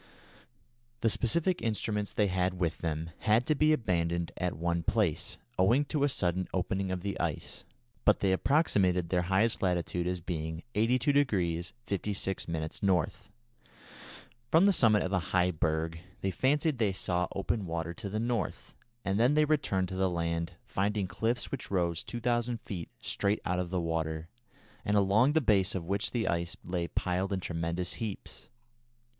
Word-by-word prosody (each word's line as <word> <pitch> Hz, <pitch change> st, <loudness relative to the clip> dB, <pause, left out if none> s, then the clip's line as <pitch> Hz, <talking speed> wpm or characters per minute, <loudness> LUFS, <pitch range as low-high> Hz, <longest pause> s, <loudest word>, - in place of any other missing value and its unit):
The 115 Hz, -, +3 dB
scientific 170 Hz, -, +1 dB
instruments 105 Hz, -2 st, -1 dB
they 105 Hz, -, +2 dB
had 90 Hz, -1 st, 0 dB
with 85 Hz, -3 st, 0 dB
them 80 Hz, 0 st, -3 dB
had 110 Hz, +3 st, +3 dB
to 155 Hz, -, +3 dB
be 155 Hz, +1 st, +3 dB
abandoned 85 Hz, -, 0 dB
at 90 Hz, -4 st, -2 dB
one 85 Hz, +1 st, 0 dB
place, 90 Hz, -2 st, 0 dB, 0.2 s
owing 120 Hz, +10 st, +4 dB
to 145 Hz, 0 st, -1 dB
a 145 Hz, -, +4 dB
sudden 90 Hz, -6 st, 0 dB
opening 95 Hz, +1 st, -1 dB
of 90 Hz, -1 st, -2 dB
the 100 Hz, +1 st, -3 dB
ice, -, -, -3 dB, 0.4 s
but -, -, +4 dB
they 95 Hz, -, +2 dB
approximated 95 Hz, -, +2 dB
their 90 Hz, -1 st, +2 dB
highest 95 Hz, +6 st, +1 dB
latitude 90 Hz, -1 st, 0 dB
as 90 Hz, 0 st, -1 dB
being 80 Hz, -1 st, -4 dB
82° 110 Hz, -, +2 dB
56' 100 Hz, -2 st, -2 dB
N. 80 Hz, -1 st, -2 dB, 1.8 s
From 165 Hz, +7 st, +6 dB
the 200 Hz, -, +5 dB
summit 110 Hz, -, +4 dB
of 95 Hz, -, -3 dB
a 90 Hz, -, +3 dB, 0.2 s
high 90 Hz, 0 st, +4 dB
berg, 80 Hz, 0 st, -1 dB, 0.2 s
they 95 Hz, -, 0 dB
fancied 140 Hz, -, +1 dB
they 105 Hz, -4 st, +2 dB
saw 90 Hz, -2 st, 0 dB
open 100 Hz, 0 st, -1 dB
water 85 Hz, 0 st, -3 dB
to 105 Hz, +1 st, -6 dB
the 105 Hz, +2 st, -2 dB
North, 115 Hz, -7 st, -2 dB, 0.3 s
and 95 Hz, +1 st, +1 dB
then 125 Hz, +5 st, +4 dB
they 155 Hz, 0 st, +5 dB
returned 100 Hz, -, +1 dB
to 95 Hz, -, -5 dB
the 95 Hz, 0 st, +2 dB
land, 85 Hz, -1 st, -2 dB
finding 100 Hz, 0 st, 0 dB
cliffs 115 Hz, +5 st, -1 dB
which -, -, -4 dB
rose 85 Hz, -4 st, 0 dB
2000 120 Hz, 0 st, -1 dB
feet 90 Hz, -8 st, -6 dB
straight 100 Hz, +1 st, 0 dB
out 90 Hz, 0 st, 0 dB
of 90 Hz, -1 st, -2 dB
the 90 Hz, 0 st, 0 dB
water, 80 Hz, -1 st, -2 dB, 0.5 s
and 105 Hz, 0 st, +2 dB
along 105 Hz, +8 st, +4 dB
the 160 Hz, -, +4 dB
base 100 Hz, -6 st, +3 dB
of 90 Hz, -3 st, -3 dB
which 100 Hz, +4 st, 0 dB
the 115 Hz, -3 st, -1 dB
ice 85 Hz, 0 st, -1 dB
lay 90 Hz, -1 st, -2 dB
piled 95 Hz, +3 st, -1 dB
in 95 Hz, -, 0 dB
tremendous 85 Hz, 0 st, -2 dB
heaps. 110 Hz, 0 st, -6 dB
95 Hz, 165 wpm, -30 LUFS, 85-115 Hz, 1.8 s, From